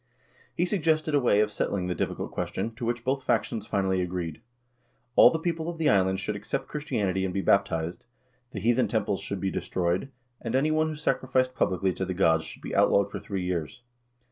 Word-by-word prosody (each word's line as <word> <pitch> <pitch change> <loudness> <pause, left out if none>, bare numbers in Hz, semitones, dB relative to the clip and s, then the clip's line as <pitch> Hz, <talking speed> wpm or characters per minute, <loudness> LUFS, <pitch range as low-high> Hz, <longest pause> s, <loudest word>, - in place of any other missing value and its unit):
He 175 - +2
suggested 160 -5 +1
a 145 - +5
way 105 -5 +4
of 105 0 +1
settling 100 -2 -1
the 90 - -1
difficult - - -3
ques - - -3
tion, 115 - -2
to 115 +1 -5
which 120 0 -2
both 135 +2 0
factions 110 -4 -1
finally 95 -2 +1
agreed. 90 -3 -4 0.7
All - - +9
the 160 - -1
people 165 0 -2
of 170 - -5
the 160 -2 +2
island 95 -4 +3
should 105 +1 -3
accept 105 +7 -3
Christianity 100 - -1
and 95 - -1
be 100 - +1
baptized, 85 -1 +1 0.4
the 110 - -6
heathen 120 +5 +2
temples 105 -3 -1
should 100 - -4
be 95 +1 -1
destroyed, 90 +9 -1 0.3
and 115 - -3
any 145 +4 +2
one 155 0 +2
who 155 - -4
sacrificed 130 -3 0
publicly 95 -4 +1
to 95 - -3
the 95 0 -3
gods 80 -3 +3
should - - -11
be - - -4
outlawed 100 0 +4
for - - -4
three 95 -2 -4
years. 90 +6 -3
105 Hz, 205 wpm, -27 LUFS, 95-135 Hz, 0.7 s, All